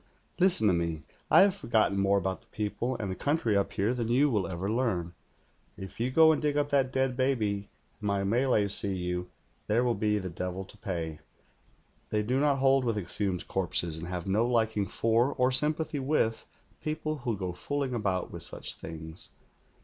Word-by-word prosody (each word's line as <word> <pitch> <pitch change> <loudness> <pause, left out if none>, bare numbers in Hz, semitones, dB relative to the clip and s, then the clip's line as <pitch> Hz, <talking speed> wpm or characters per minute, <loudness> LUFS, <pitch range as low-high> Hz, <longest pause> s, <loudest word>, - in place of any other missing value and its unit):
' - - -30
Listen 180 - +3
to 100 - +5
me. 85 -2 -1 0.3
I - - +8
have 195 0 +5
forgotten 110 - +1
more 100 +1 +3
about 95 -1 -2
the - - -27
people 115 +4 -3
and 100 -4 -3
the - - -3
country 145 - 0 0.2
here 105 +3 +1
than 120 -3 -2
you 135 +5 +3
will 100 -6 +1
ever 90 +2 -3
learn. 105 -7 -1 0.6
If 95 +1 -9
you 120 +2 +1
go 160 +4 +6
and 155 - 0
dig 150 -1 0
up 145 0 +1
that 135 -2 +2
dead 130 -1 +1
baby, 110 -7 0 0.3
and 105 - -4
my 100 -1 +1
Malays 110 -1 +2
see 100 -2 -2
you, 90 0 -3 0.4
there 115 +4 +2
will 120 -1 +2
be 105 -2 +1
the 95 -2 -3
devil 90 +3 -4
to - - -15
pay. 80 -5 -4 0.9
They 105 0 0
do 125 +5 0
not 145 -1 +3
hold 135 0 +4
with 115 -3 0
exhumed 95 -1 -2
corpses, 85 -3 0
and 85 - -6
have 90 -1 -4
no 105 +5 +2
liking 110 -4 +1
for 115 +4 +2
or 125 0 +2
sympathy 150 +3 0
with 130 -5 0 0.3
people 155 0 -2
who 120 -5 -2
go 90 -2 -3
fooling 140 +4 -3
about 95 -6 -1
with - - -7
such - - -5
things. 80 0 -9
110 Hz, 195 wpm, -29 LUFS, 95-130 Hz, 0.9 s, I